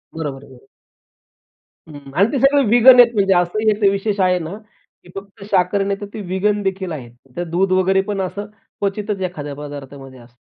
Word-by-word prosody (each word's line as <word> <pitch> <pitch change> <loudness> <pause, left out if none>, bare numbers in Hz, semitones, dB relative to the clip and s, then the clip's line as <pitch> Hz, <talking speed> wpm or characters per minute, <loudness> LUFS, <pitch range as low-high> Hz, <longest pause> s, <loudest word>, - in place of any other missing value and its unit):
बरोबर 145 -4 -5
आहे, - - -16
बरोबर. 130 +1 -18 1.2
हं, 145 -3 -12
आणि 200 +5 +3
ते 275 - -1
सगळं 275 +2 +4
वीगन 245 +2 +7
आहेत 240 -1 +7
म्हणजे 195 -2 +3
असंही 180 +5 +1
एक 210 0 -3
विशेष 200 +1 -2
आहे, 180 -1 +2
ना 170 +4 -6 0.5
की - - -18
फक्त 195 +1 -10
शाकाहारी 195 +2 +1
नाही 200 0 -2
तर - - -4
ते 215 - -6
वीगनदेखील 195 -1 -1
आहेत. 130 -7 -7 0.3
तर 175 - -1
दूध 185 +3 0
वगैरे 185 +1 +2
पण 195 -1 -2
असं 200 +2 -4 0.3
क्वचितच 200 0 -3
एखाद्या 150 -6 -5
पदार्थामध्ये 140 -2 -10
असतं. 120 0 -20
190 Hz, 180 wpm, -19 LUFS, 155-205 Hz, 1.2 s, वीगन